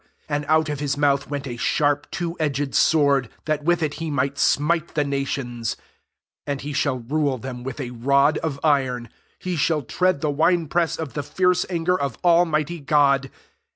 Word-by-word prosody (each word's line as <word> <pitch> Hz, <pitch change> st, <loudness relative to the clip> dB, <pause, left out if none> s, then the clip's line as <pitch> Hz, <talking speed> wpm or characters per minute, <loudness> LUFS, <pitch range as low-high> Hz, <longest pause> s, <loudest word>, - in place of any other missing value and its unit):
15 145 Hz, -, -1 dB
And 145 Hz, 0 st, -2 dB
out 160 Hz, 0 st, +3 dB
of 150 Hz, -2 st, -3 dB
his 145 Hz, -2 st, -1 dB
mouHh 140 Hz, -1 st, +1 dB
went 145 Hz, -1 st, -4 dB
a 120 Hz, -3 st, -5 dB
sharp 145 Hz, +3 st, +1 dB
two 170 Hz, -1 st, -3 dB
edged 145 Hz, -2 st, -1 dB
sword, 140 Hz, -6 st, +3 dB, 0.2 s
that 155 Hz, -1 st, -1 dB
with 170 Hz, +1 st, +2 dB
it 150 Hz, -2 st, -1 dB
he 165 Hz, -, -2 dB
might 140 Hz, -1 st, -1 dB
smite 160 Hz, +3 st, +1 dB
the 150 Hz, -1 st, +1 dB
nations^ 135 Hz, -4 st, -3 dB, 0.7 s
and 140 Hz, -1 st, -2 dB
he 145 Hz, +1 st, -5 dB
shall 140 Hz, -2 st, 0 dB
rule 140 Hz, +2 st, 0 dB
them 125 Hz, 0 st, -7 dB
with 135 Hz, +3 st, -6 dB
a 125 Hz, -3 st, -4 dB
rod 140 Hz, +5 st, +2 dB
of 145 Hz, -4 st, -3 dB
iron: 130 Hz, -6 st, +1 dB, 0.3 s
he 180 Hz, -1 st, -3 dB
shall 155 Hz, -1 st, +1 dB
tread 180 Hz, +4 st, 0 dB
the 150 Hz, -2 st, 0 dB
wine 165 Hz, +3 st, +2 dB
press 170 Hz, +2 st, 0 dB
of 160 Hz, -4 st, -5 dB
the 145 Hz, -, -2 dB
fierce 180 Hz, +5 st, +1 dB
anger 175 Hz, 0 st, +1 dB
of 140 Hz, -4 st, -2 dB
Almighty 170 Hz, -2 st, +2 dB
God. 140 Hz, -2 st, +2 dB
145 Hz, 190 wpm, -23 LUFS, 140-160 Hz, 0.7 s, out